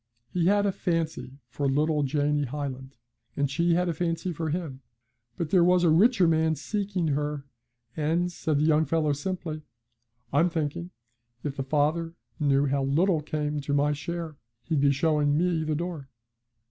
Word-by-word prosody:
He 175 -1 +1
had 205 +1 +3
a 200 - +2
fancy 165 -7 -2
for 140 -1 -2
little 150 +2 +1
Janie 145 +1 +1
Hyland, 135 -1 -6 0.4
and 140 -1 0
she 170 +3 +2
had 180 +1 +1
a 170 - 0
fancy 165 +2 -2
for 160 0 -3
him, 150 -5 -4 0.6
but 165 -2 -3
there 180 -3 +5
was 180 0 +4
a 165 - +5
richer 195 +2 +5
man 160 0 +2
seeking 190 +1 -2
her, 145 0 -2 0.5
and, 165 +4 0
said 155 -3 -1
the 145 - +2
young 155 0 +3
fellow 155 0 +1
simply, 155 0 -4 0.7
'I'm 165 +5 +4
thinking 165 +1 -3 0.5
if 145 -2 -3
the 140 - -3
father 155 +4 0 0.2
knew 140 -1 +3
how 140 0 0
little 160 +5 +2
came 150 0 -2
to 140 +1 -1
my 145 +1 +2
share 165 0 -5 0.3
he'd 155 -4 0
be 140 0 +4
showing 150 0 +2
me 170 -1 +1
the 155 -1 -1
door.' 165 -4 -5
155 Hz, 170 wpm, -27 LUFS, 145-170 Hz, 0.7 s, there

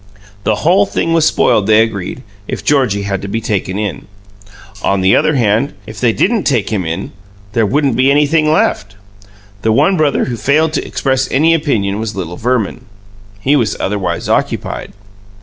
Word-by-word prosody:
The 110 - +2
whole 195 +4 +4
thing 165 - -1
was 165 -1 +3
spoiled, 105 -8 +2
they 110 0 +5
agreed, 110 +2 -5 0.2
if - - -5
Georgie 130 -9 +2
Bassett 100 - -5
had 95 -1 -2
to 100 - -6
be 110 +3 -2
taken 100 -3 -2
in. 105 -4 -4 0.7
On 100 -1 +1
the 95 +1 +4
other 155 - +2
hand, 115 +3 +1
if 110 +1 -9
they 120 -2 +3
didn't 220 - 0
take 115 -8 0
him 95 -6 -1
in, 80 +1 -4 0.4
"there 115 -3 +2
wouldn't 140 0 +1
be 130 +3 +3
anything 150 +2 +3
left." 100 -9 0 0.7
The 110 - +1
one 190 - +3
brother 150 -2 +1
who 120 -2 -4
failed 150 +7 +1
to - - -1
express 130 -1 -1
any 160 +4 +3
opinion 110 -11 0
was 110 -1 -4
little 90 -3 -5
Verman. 125 0 -1 0.6
He 140 +6 +2
was 120 -6 0
otherwise 100 -1 -2
occupied. - - -2
115 Hz, 180 wpm, -15 LUFS, 100-145 Hz, 0.7 s, they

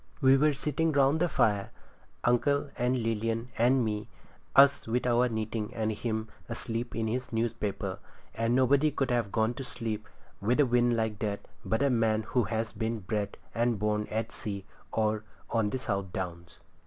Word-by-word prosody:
We 135 -2 +6
were 150 +3 +4
sitting 150 +4 0
round 140 +2 +4
the 175 +1 +2
fire, 105 -8 +2 0.5
uncle 140 +4 +2
and 125 +1 +1
Lilian 115 +1 -1
and 125 +1 +3
me, 105 -1 -2 0.5
us 140 -2 +6
with 125 +3 0
our 125 0 +3
knitting 110 0 -3
and 110 -1 0
him 110 0 -2 0.2
asleep 115 0 -3
in 115 0 0
his 125 +4 -2
newspaper, 115 -3 -2 0.3
and 115 +1 +1
nobody 135 +4 +4
could 135 -3 -1
have 120 -5 0
gone 110 +1 +1
to 135 - -6
sleep 110 -3 -4 0.3
with 120 +7 +1
a 145 - +6
wind 120 -1 +3
like 110 -2 -1
that 105 -2 -3 0.2
but 110 +4 0
a 140 - +3
man 110 -2 +2
who 115 +1 +1
has 110 +1 -2
been 110 0 -2
bred 100 +1 -2 0.2
and 120 -1 +1
born 105 0 0
at 110 +1 -2
sea, 100 -2 -5 0.3
or 110 -1 +1 0.3
on 110 -3 +2
the 130 - -2
South 100 -7 -2
Downs. 85 -2 -6
115 Hz, 175 wpm, -30 LUFS, 110-125 Hz, 0.5 s, We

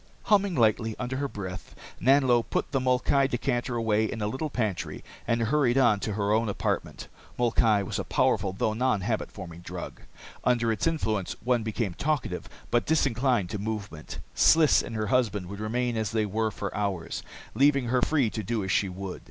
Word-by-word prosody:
Humming 200 -3 +3
lightly 110 -2 +2
under 125 +1 -3
her 140 +1 -1
breath, 95 -6 -7 0.3
Nanlo 130 -2 +4
put 115 - -3
the 135 - +1
molkai 130 +2 +2
decanter 120 -1 -1
away 110 -2 +1
in 115 - -5
a 105 - -1
little 135 +9 -2
pantry 110 -9 -3 0.2
and 115 0 +1
hurried 130 0 +2
on 120 -6 +4
to 105 - -3
her 100 0 0
own 110 0 +2
apartment. 100 - -3 0.3
Molkai 115 -3 +3
was - - -3
a - - -1
powerful, 95 - +1
though 100 +3 -1
non 125 -2 +1
habit - - -2
forming 85 0 -9
drink. 85 - -7 0.4
Under 120 -2 +2
its 110 - 0
influence 110 - -1
one 125 0 +2
became 110 -3 -2
talkative, 135 - -2 0.2
but 120 - +2
disinclined 125 - +1
to 105 - -3
movement. 100 -7 -5 0.2
Sliss 160 -2 +5
and 115 - -7
her 110 -1 -1
husband 105 -7 +1
would 100 +1 -7
remain 120 +3 -1
as 110 -2 -1
they 110 -1 0
were 110 +2 0
for 100 -1 -5
hours, 100 -5 -2 0.3
leaving 140 -3 +3
her 125 0 +2
free 135 -8 +2
to 110 - -3
do 110 +1 -2
as 95 - -2
she 95 - +2
would. 95 0 -6
115 Hz, 185 wpm, -27 LUFS, 105-130 Hz, 0.4 s, Sliss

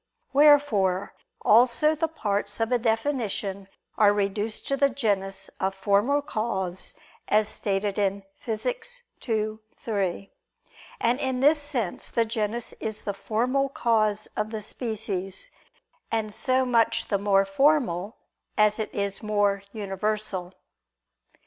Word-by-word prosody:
Wherefore 270 -11 +4 0.3
also 250 +7 +5
the 320 +1 0
parts 205 -9 -2
of 225 +1 0
a 245 - +3
definition 220 -5 -1 0.3
are 210 -2 +7
reduced 205 +2 -2
to 275 - +2
the 280 0 +3
genus 195 -6 -1
of 190 0 -1
formal 205 +9 +2
cause, 190 -7 -2 0.3
as 215 +1 +3
is - - -7
stated 200 0 -1
in 200 0 0 0.2
Phys. - - -2 0.3
ii, 215 -1 -1 0.2
3. 200 -3 -2 0.7
And 240 +3 +2
in 260 -1 0
this 295 +2 +5
sense 260 -10 -3
the 230 - +1
genus 225 +1 -2
is 220 -1 -4
the 200 - -2
formal 250 +7 0
cause 215 -5 +1
of 210 - -1
the 220 -1 -4
species; 200 -5 -4 0.6
and 220 -2 -1
so 260 +2 +2
much 230 -2 +2
the 200 - +1
more 195 -1 +3
formal, 215 - +1 0.4
as 210 0 +4
it 220 - -2
is 200 -1 0
more 205 -2 +1
universal. 200 -3 -3
215 Hz, 130 wpm, -26 LUFS, 200-245 Hz, 0.7 s, are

